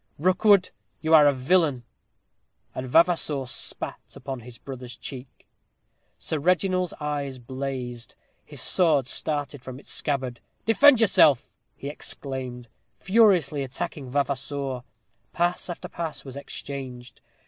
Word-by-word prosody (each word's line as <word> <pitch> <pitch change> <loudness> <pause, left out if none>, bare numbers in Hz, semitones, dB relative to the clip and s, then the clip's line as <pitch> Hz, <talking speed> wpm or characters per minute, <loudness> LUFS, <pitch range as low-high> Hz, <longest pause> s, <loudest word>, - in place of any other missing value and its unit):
"Rookwood, 185 +4 +4 0.3
you 160 0 +1
are 150 -2 +9
a - - +6
villain." 140 -1 +2 0.9
And 130 0 -5
Vavasour 160 -3 +3
spat 120 - -1
upon 130 0 -6
his 120 0 -11
brother's 125 -2 -8
cheek. 130 0 -10 0.7
Sir 160 - -2
Reginald's 180 +2 +1
eyes 145 -3 -3
blazed. 125 -1 -5 0.3
His - - -7
sword 155 -8 +3
started 145 -2 -2
from 130 0 -8
its - - -8
scabbard. 130 -5 -1 0.3
"Defend 255 +3 +6
yourself!" 185 - +4 0.2
he 140 - -7
exclaimed, 130 -4 -7 0.3
furiously 185 - +4
attacking 135 +1 -5
Vavasour. 140 -1 -2 0.5
Pass 175 +1 0
after 175 - -5
pass 165 -4 -5
was 135 -1 -8
exchanged. 130 -3 -8
140 Hz, 115 wpm, -26 LUFS, 130-170 Hz, 0.9 s, are